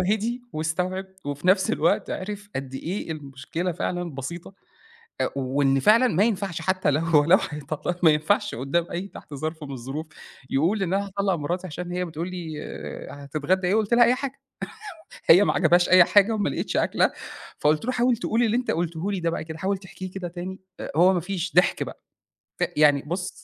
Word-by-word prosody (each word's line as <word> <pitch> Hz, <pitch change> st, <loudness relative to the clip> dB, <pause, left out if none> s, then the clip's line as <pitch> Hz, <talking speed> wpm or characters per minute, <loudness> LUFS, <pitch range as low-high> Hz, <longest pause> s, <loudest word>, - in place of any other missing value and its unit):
هِدِي 220 Hz, +6 st, 0 dB
واستوعب 180 Hz, +5 st, -2 dB, 0.2 s
وفي 145 Hz, +3 st, -4 dB
نفس 190 Hz, 0 st, +4 dB
الوقت 165 Hz, +3 st, +1 dB
عِرِف 205 Hz, +1 st, -5 dB
قد 135 Hz, -1 st, -5 dB
إيه 170 Hz, +5 st, -4 dB
المشكلة 150 Hz, +4 st, -4 dB
فعلًا 175 Hz, -1 st, -3 dB
بسيطة 170 Hz, +8 st, -7 dB, 0.7 s
أ -, -, +2 dB
وإن 135 Hz, +1 st, +2 dB
فعلًا 230 Hz, -, +5 dB
ما 195 Hz, 0 st, +3 dB
ينفعش 200 Hz, -6 st, -1 dB
حتّى 185 Hz, +1 st, +1 dB
لو 145 Hz, +2 st, +1 dB
هو 160 Hz, -3 st, +4 dB
لو 180 Hz, +5 st, +6 dB
هيطلّقها 150 Hz, +3 st, -4 dB
ما 160 Hz, -, +7 dB
ينفعش 155 Hz, +7 st, +1 dB
قدام 140 Hz, +8 st, 0 dB
أي 185 Hz, +3 st, -4 dB
تحت 150 Hz, -, -11 dB
ظرف 155 Hz, +3 st, -4 dB
من 140 Hz, -, -7 dB
الظروف 135 Hz, +5 st, -5 dB, 0.4 s
يقول 175 Hz, +10 st, +1 dB
إن: 185 Hz, 0 st, 0 dB
"أنا 200 Hz, +1 st, 0 dB
هاطلق 200 Hz, 0 st, 0 dB
مراتي 175 Hz, +4 st, -3 dB
عشان 175 Hz, +2 st, -6 dB
هي 180 Hz, 0 st, -1 dB
بتقول 165 Hz, +1 st, -5 dB
لي 175 Hz, -3 st, -6 dB
آآ 140 Hz, 0 st, -8 dB
هتتغدى 155 Hz, +6 st, 0 dB
إيه 200 Hz, -, +2 dB
قُلت 220 Hz, +1 st, +2 dB
لها 240 Hz, 0 st, +7 dB
أي 240 Hz, -, +4 dB
حاجة" 275 Hz, +1 st, -5 dB, 0.9 s
هي 180 Hz, +5 st, +8 dB
ما -, -, +2 dB
عجبهاش 175 Hz, +1 st, +4 dB
أي 185 Hz, -1 st, +8 dB
حاجة 205 Hz, +4 st, +4 dB
وما 210 Hz, -7 st, 0 dB
لقيتش -, -, -2 dB
أكلة -, -, +2 dB, 0.5 s
فقُلت 150 Hz, +4 st, +2 dB
له: 255 Hz, -, 0 dB
"حاول 245 Hz, -1 st, +2 dB
تقول 230 Hz, +1 st, 0 dB
اللي 230 Hz, 0 st, +2 dB
أنت 250 Hz, -, -1 dB
قُلته 170 Hz, +3 st, -2 dB
لي 190 Hz, -, -2 dB
ده 170 Hz, -1 st, 0 dB
بقى 165 Hz, -, -3 dB
كده 160 Hz, 0 st, -8 dB
حاول 195 Hz, +2 st, -1 dB
تحكيه 185 Hz, -1 st, -9 dB
كده 185 Hz, -2 st, -5 dB
تاني." 180 Hz, +2 st, -6 dB, 0.4 s
هو 180 Hz, +3 st, +6 dB
ما 180 Hz, -, +1 dB
فيش 180 Hz, 0 st, -4 dB
ضحْك 180 Hz, 0 st, +3 dB
بقى -, -, -7 dB, 0.6 s
ف -, -, +2 dB
يعني 145 Hz, -2 st, +5 dB
بُص 180 Hz, +5 st, -3 dB
175 Hz, 195 wpm, -25 LUFS, 155-195 Hz, 0.9 s, هي